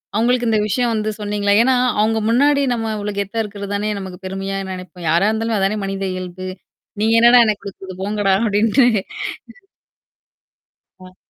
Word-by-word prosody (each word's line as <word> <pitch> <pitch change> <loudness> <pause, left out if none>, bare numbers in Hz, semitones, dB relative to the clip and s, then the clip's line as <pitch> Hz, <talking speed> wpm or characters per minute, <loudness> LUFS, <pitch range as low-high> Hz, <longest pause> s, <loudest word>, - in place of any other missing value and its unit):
அவங்களுக்கு 240 +2 +2
இந்த 220 - +2
விஷயம் 240 +2 0
வந்து 215 -1 -1
சொன்னீங்களா? 205 -1 0
ஏன்னா 260 +1 +3 0.2
அவங்க 220 +1 +2
முன்னாடி 280 +4 +3
நம்ம 225 -1 -2
இவ்வளோ 205 0 -4
கெத்தா 200 +3 -3
இருக்குறதுதானே 205 0 -4
நமக்குப் 190 -1 -9
பெருமையா 195 +1 -4
நெனைப்போம். 180 -2 -7
யாரா 170 +5 +3
இருந்தாலும் 225 +1 -1
அதுதானே 195 +2 0
மனித 195 0 -4
இயல்பு. 185 0 -6 0.5
"நீங்க 220 +1 +2
என்னடா 240 +1 +7
எனக்குக் 210 -2 -1
குடுத்தது 190 -1 -9
போங்கடா!" 205 -1 +1
அப்படீன்ட்டு. 225 +4 +3
ம்ஹம். 195 -3 -4 1.8
அ. 185 0 -14
205 Hz, 150 wpm, -19 LUFS, 195-225 Hz, 1.8 s, என்னடா